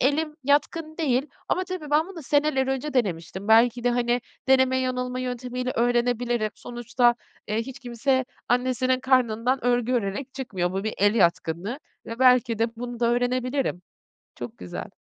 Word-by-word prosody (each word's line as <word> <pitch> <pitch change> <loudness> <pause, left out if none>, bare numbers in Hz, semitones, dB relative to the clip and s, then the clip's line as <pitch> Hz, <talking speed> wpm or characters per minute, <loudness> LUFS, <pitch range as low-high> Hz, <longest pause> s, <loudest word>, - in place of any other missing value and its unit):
elim 300 +3 +1
yatkın 310 +3 +1
değil 275 -4 +1 0.2
ama 370 - +1
tabii 365 -5 -6
ben 310 +3 +3
bunu 350 -5 -9
seneler 285 -1 +2
önce 270 +2 -2
denemiştim. 190 -3 -2
Belki 235 +2 +5
de, 245 - +4
hani, 240 0 +1 0.3
deneme 260 0 +4
yanılma 250 0 -2
yöntemiyle 250 0 -3
öğrenebilirim. 240 -2 +1
Sonuçta, 240 0 +1 0.3
eee, 215 - 0
hiç 260 +4 -5
kimse 260 +1 0 0.2
annesinin 255 +1 +1
karnından 255 -1 +2
örgü 245 0 +2
örerek 245 +4 -2
çıkmıyor. 190 -10 -2
Bu 195 +2 -3
bir 220 - -2
el 205 +2 +4
yatkınlığı 175 - +1 0.3
ve 230 +1 -6
belki 250 -3 +4
de 230 +1 -1
bunu 240 0 -6
da 235 - +3
öğrenebilirim. 250 -3 0 0.5
Çok 120 -1 -8
güzel. 90 -1 -6
245 Hz, 150 wpm, -25 LUFS, 230-265 Hz, 0.5 s, Belki